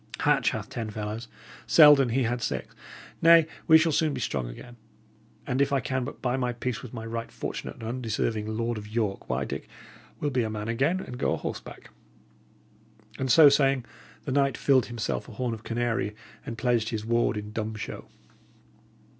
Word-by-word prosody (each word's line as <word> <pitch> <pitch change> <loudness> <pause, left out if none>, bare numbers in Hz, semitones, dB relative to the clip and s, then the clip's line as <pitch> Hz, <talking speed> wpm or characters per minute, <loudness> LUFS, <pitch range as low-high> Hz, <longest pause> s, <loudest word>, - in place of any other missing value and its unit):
Hatch - - +3
hath - - -4
ten 115 -2 -5
fellows; 105 +2 -5 0.4
Selden, 145 -5 +7
he 130 +3 +1
had 120 +1 -1
six. - - -3 0.5
Nay, 165 -1 +7 0.2
we 160 - +9
shall 160 +1 +2
soon 155 0 +1
be - - -4
strong 65 -4 -2
again; 120 - -11 0.7
and 130 +2 0
if 140 0 +2
I 140 - +3
can 130 0 -2
but 145 - -9
buy 125 0 +1
my 125 -2 -1
peace 120 0 -3
with 125 - -9
my 115 -2 -7
right 115 0 -5
fortunate - - -5
and - - -12
undeserving 110 -2 -2
Lord 115 +1 -2
of 105 - -10
York, 105 -2 -2
why, - - -1
Dick, - - -6 0.5
we'll 145 - -1
be 130 -1 +1
a 110 - -1
man 105 0 -4
again 145 +11 +1
and 125 -7 -8
go - - +1
a - - -1
horseback!" - - -7 1.3
And 130 -1 0
so 155 +4 +9
saying, 135 -3 +3 0.4
the 140 - -3
knight 140 0 +2
filled 135 -3 +3
himself 120 +1 -3
a - - -10
horn 120 +2 -2
of 110 - -7
canary, 115 -2 -1 0.3
and 115 - -5
pledged 120 -3 +1
his 110 -2 -4
ward 115 -1 +1
in 105 0 -6
dumb 110 -1 -3
show. 105 - -6
120 Hz, 190 wpm, -27 LUFS, 110-135 Hz, 1.3 s, we